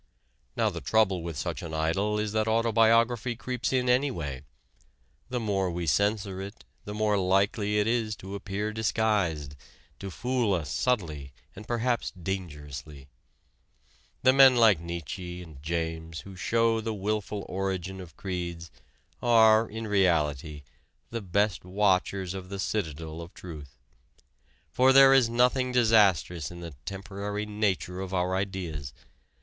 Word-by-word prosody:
Now - - +1
the - - -6
trouble 100 -5 +2
with 85 -3 -5
such - - -3
an 80 -2 -6
idol 95 +7 0
is 105 -1 -1
that 110 0 0
autobiography 115 +1 +3
creeps 125 +1 -3
in 130 -1 +1
anyway. 120 - 0 0.9
The 125 -1 -2
more 100 -4 0
we 85 0 -3
censor 100 +2 0
it, 100 +3 -9 0.2
the 105 - -6
more 105 -1 +1
likely 100 +3 +1
it 105 - +2
is 115 -2 0
to 95 0 -9
appear 100 +2 -3
disguised, 100 -10 0 0.4
to 100 - -6
fool 120 +1 0
us 75 -6 -4
subtly 75 - -1 0.2
and 105 - -11
perhaps 120 0 0
dangerously. 75 -6 -7 1.1
The 130 +1 +6
men 135 -1 +8
like 110 -7 +5
Nietzsche 85 +1 -6
and 75 -5 -13
James 80 -1 -3
who 95 +5 -11
show 115 +3 +1
the 110 0 -3
wilful 105 0 -3
origin 95 -1 -3
of 85 -4 -13
creeds 85 -3 -5 0.5
are 110 -2 +5
in 110 +1 -5
reality 75 -7 +1 0.5
the 115 -1 -3
best 100 +2 0
watchers 95 -1 +1
of 95 -1 -7
the 100 - -5
citadel 80 -5 -3
of 85 +1 -11
truth. 75 -7 -10 0.9
For 130 +1 +4
there 135 0 +8
is 130 -4 +5
nothing 125 +2 +2
disastrous 100 - +3
in 85 - -10
the 85 -3 -7
temporary 100 +1 -4
nature 100 -3 -1
of 95 0 -4
our 90 +1 0
ideas. 90 -8 -4
100 Hz, 140 wpm, -28 LUFS, 85-110 Hz, 1.1 s, men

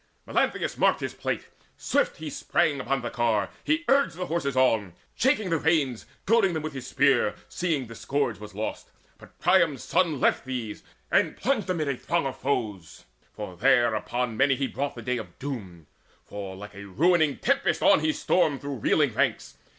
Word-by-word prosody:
Melanthius - - 0
marked - - +3
his - - -3
plight: - - -3 0.3
swiftly 175 - 0
he - - -3
sprang 155 -2 +1
Upon 135 0 -1
the 120 - -3
car; 110 -5 0
he 315 +3 0
urged 275 -8 +3
the 180 +1 -3
horses 150 -6 -2
on, 110 -8 +2 0.2
Shaking 230 -8 +1
the 165 - +2
reins, 145 -7 +1 0.2
goading 205 -3 +3
them 155 - -2
with 155 - -4
his 130 -2 -7
spear, 140 -2 +3
Seeing 160 -7 -1
the 115 - -10
scourge 120 -3 -2
was 105 -2 -10
lost. 110 +1 -4 0.3
But - - -17
Priam's 170 -6 +3
son 160 -7 +1
Left - - +2
these, 125 -5 -5 0.3
and - - +2
plunged 240 -7 0
amid 165 -5 0
a 140 - 0
throng 170 +4 -1
of 135 - -3
foes. 110 - -3 0.3
There 120 +4 +2
upon 120 +2 -2
many 135 +1 +4
he 135 - -1
brought 140 +2 -3
the - - -8
day 125 -1 -1
of 90 -6 -10
doom; 100 - -6 0.4
For 100 -2 -7
like 105 +2 -10
a 100 +1 -9
ruining 155 - +2
tempest 275 +2 +1
on - - +6
he 315 - +1
stormed 160 - +1
Through 140 -1 -4
reeling 140 +3 +2
ranks. 130 -1 -1
135 Hz, 180 wpm, -26 LUFS, 115-165 Hz, 0.4 s, on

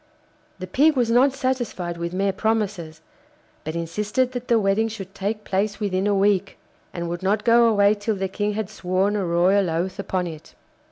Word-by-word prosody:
The 185 - -6
Pig 290 - +3
was 240 -3 +1
not 255 +4 +5
satisfied 250 -10 -2
with 170 0 -4
mere 195 +2 0
promises, 195 -7 -2 0.6
but 155 +1 -5
insisted 210 +9 -1
that 250 -1 -6
the 235 - +4
wedding 205 +2 +1
should 195 -4 -8
take 210 +2 -3
place 200 +2 -1
within 195 -2 -1
a 205 - +2
week, 195 -1 +1 0.3
and 170 -1 -4
would 170 +1 -4
not 200 +3 0
go 235 0 +5
away 205 -2 +4
till 210 +1 -2
the 190 0 -2
King 205 +2 -2
had 215 -1 -3
sworn 190 +1 0
a 205 - 0
royal 180 +2 +2
oath 175 +4 -2
upon 185 -2 -2
it. 160 -3 -9
200 Hz, 185 wpm, -23 LUFS, 185-220 Hz, 0.6 s, not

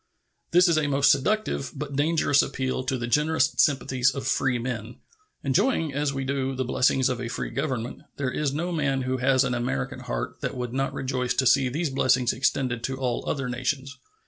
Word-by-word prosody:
This 180 +2 +5
is 165 -2 +3
a 150 - 0
most 140 0 +4
seductive 175 +1 0
but 145 0 -5
dangerous 145 -1 +3
appeal 130 -1 -2
to 130 0 0
the 120 - -3
generous 150 +6 +2
sympathies 135 -2 +3
of 135 - -4
freemen. 120 -3 -1 0.5
Enjoying, 150 - +1
as 145 0 0
we 135 -1 -3
do, 135 0 -1
the 130 0 -2
blessings 130 +1 +2
of 125 -2 -2
a 120 - -3
free 115 - -4
Government, 125 -5 -3 0.2
there 135 -3 -1
is 150 0 -1
no 170 +5 -2
man 140 -5 0
who 130 +1 -1
has 130 +1 +3
an 125 -2 -1
American 120 - -2
heart - - -5
that - - -3
would 125 -1 -4
not 135 +1 0
rejoice 130 -2 -2
to 130 - +1
see 130 +1 +4
these 155 +3 -2
blessings 130 -2 +2
extended 125 -2 0
to 130 0 -3
all 125 -3 -2
other 135 -3 -2
nations. 130 +3 -3
135 Hz, 195 wpm, -26 LUFS, 125-145 Hz, 0.5 s, This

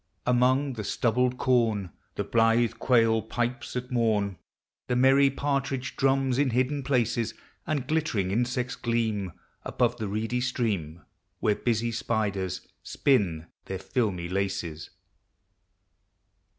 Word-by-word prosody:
Among 130 +3 +3
the 110 -3 -5
stubbled 125 +4 +1
corn 115 -9 +1 0.2
The - - -1
blithe 115 0 +3
quail 115 -3 +3
pipes 120 +3 -3
at 125 +1 -4
morn. 105 -6 +1 0.5
The 125 - 0
merry 135 +2 +5
partridge 135 -1 -2
drains 135 -1 +2
in 145 -2 +3
hidden 130 +4 0
places. 120 -4 0 0.3
And 145 -5 -1
glittering 135 -12 0
insects 125 +3 -1
gleam 110 -5 -1 0.3
Above 120 0 0
the 110 - -3
reedy 110 +4 -1
stream, 100 -11 -2 0.4
Where 105 - +2
busy 115 +2 0
spiders 105 -6 -2
spin 95 - +1 0.2
their 95 - -4
filmy 95 -5 -1
laces. 90 -4 -3
120 Hz, 115 wpm, -27 LUFS, 105-130 Hz, 0.5 s, merry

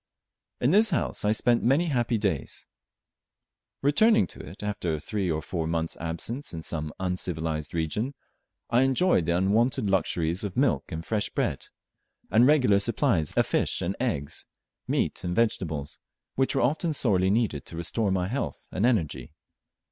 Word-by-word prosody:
In 125 - +2
this 215 +4 +5
house 170 - -1
I 105 - +3
spent 120 +2 +2
many 140 +8 +3
happy 120 -4 +1
days. 95 - -2 1.2
Returning 145 - +4
to - - -12
it 90 +8 -10
after 100 -6 -2
a - - -5
three 95 +3 -2
or 80 -1 -1
four 80 -2 -3
months' 80 0 -1
absence 85 - -4
in 80 - -6
some 75 -2 -4
uncivilized 80 -4 -3
region, 105 - -2 0.6
I 120 +1 +4
enjoyed 135 - +3
the 85 0 +2
unwonted 105 +2 +2
luxuries 85 -1 0
of 100 0 -5
milk 135 -6 +1
and 80 0 -5
fresh 105 -2 -1
bread, - - -2 0.6
and 115 +3 +6
regular 125 -9 +4
supplies 105 - +1
of - - +3
fish - - 0
and 90 +3 -1
eggs, 100 - -3 0.4
meat - - 0
and 90 -1 -2
vegetables, 80 -11 -1 0.3
which 135 +1 +1
were 135 - +2
often 155 +5 +1
sorely 95 -8 +3
needed 100 - 0
to 80 - -7
restore 100 +5 -1
my 95 -1 0
health 105 - -4
and 100 +6 +1
energy. 75 - -1
100 Hz, 160 wpm, -27 LUFS, 85-120 Hz, 1.2 s, and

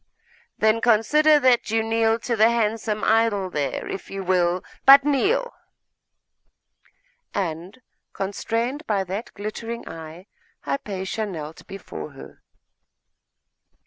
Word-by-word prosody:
'Then 220 +1 +2
consider 295 +7 +4
that 255 -5 +3
you 225 +1 +1
kneel 225 0 +2
to 235 +1 -2
the 220 +1 +5
handsome 220 -2 -1
idol 220 -4 +2
there, 145 -4 -3
if - - -6
you 195 0 -5
will 180 -1 +1 0.2
but 275 +1 +9
kneel!' 395 - +1 1.8
And, 180 +4 -4 0.3
constrained 230 +9 -3
by 200 -3 +1
that 195 +5 -5
glittering 225 +3 -6
eye, 165 +3 -9 0.4
Hypatia 205 -4 -3
knelt 160 -4 -8
before 195 -6 -8
her. 135 - -13
215 Hz, 110 wpm, -23 LUFS, 190-235 Hz, 1.8 s, but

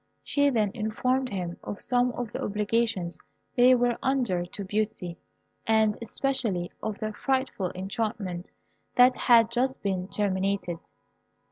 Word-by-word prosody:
She 285 0 +2
then 215 -6 +1
informed 250 +4 0
him 180 -5 -4
of 205 - -6
some 245 0 +2
of 240 -3 -4
the - - -4
obligations 210 -5 0 0.4
they 250 +1 +7
were 245 -1 +1
under 245 -10 +1
to 200 - -6
Beauty, 205 -3 -2 0.5
and 220 -1 +4
especially 230 -7 -1
of 215 -2 -3
the 215 0 -3
frightful 260 -7 -1
enchantment 190 -2 -3 0.5
that 250 +1 +7
had 230 -2 +5
just 260 +2 0
been 190 -2 -1
terminated. 195 -3 -1
215 Hz, 130 wpm, -27 LUFS, 190-245 Hz, 0.5 s, they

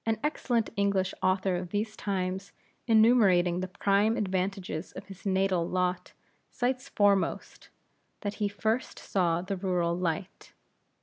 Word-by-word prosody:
An 225 -1 0
excellent 245 -6 0
English 200 -2 +1
author 185 0 +1
of 175 0 -4
these 215 +2 -2
times 190 -2 -3 0.3
enumerating 215 -6 +5
the 185 - -3
prime 200 +4 +2
advantages 190 -5 -2
of - - -8
his 195 +1 -9
natal 190 -3 +1
lot, 180 0 -1 0.4
cites 255 +1 -2
foremost, 200 -2 +1 0.5
that 205 -2 -3
he 205 - +3
first 220 +4 -2
saw 175 -3 0
the 195 +1 -3
rural 180 -2 0
light. 180 +1 -4
195 Hz, 130 wpm, -29 LUFS, 180-210 Hz, 0.5 s, enumerating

